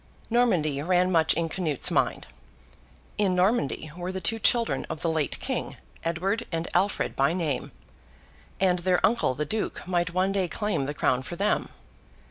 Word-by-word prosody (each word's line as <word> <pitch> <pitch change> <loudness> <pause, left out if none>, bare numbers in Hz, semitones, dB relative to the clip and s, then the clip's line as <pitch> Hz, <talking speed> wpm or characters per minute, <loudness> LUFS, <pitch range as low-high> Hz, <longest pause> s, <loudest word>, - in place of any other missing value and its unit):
Normandy 175 - +2
ran 180 +3 +2
much 165 -3 +3
in 165 +1 0
Canute's 160 -5 +1
mind. - - +1 0.9
In 195 -3 +3
Normandy 180 - +1
were 180 +1 -4
the 190 - -3
two 225 +6 0
children 230 +1 +2
of - - -5
the 165 - +1
late 155 -3 -1
king—Edward 190 +7 -3
and 165 0 -2
Alfred 195 +3 +1
by 140 +4 +2
name; 160 -7 -2 0.9
and 180 -2 +3
their 180 0 +2
uncle 215 - +1
the 150 - -2
Duke 215 0 -3
might 175 -1 +1
one 185 +2 +1
day 195 -2 0
claim 200 -5 -2
the 145 - -4
crown 125 -2 +1
for 155 +6 -7
them. 200 +4 0
180 Hz, 160 wpm, -26 LUFS, 160-195 Hz, 0.9 s, much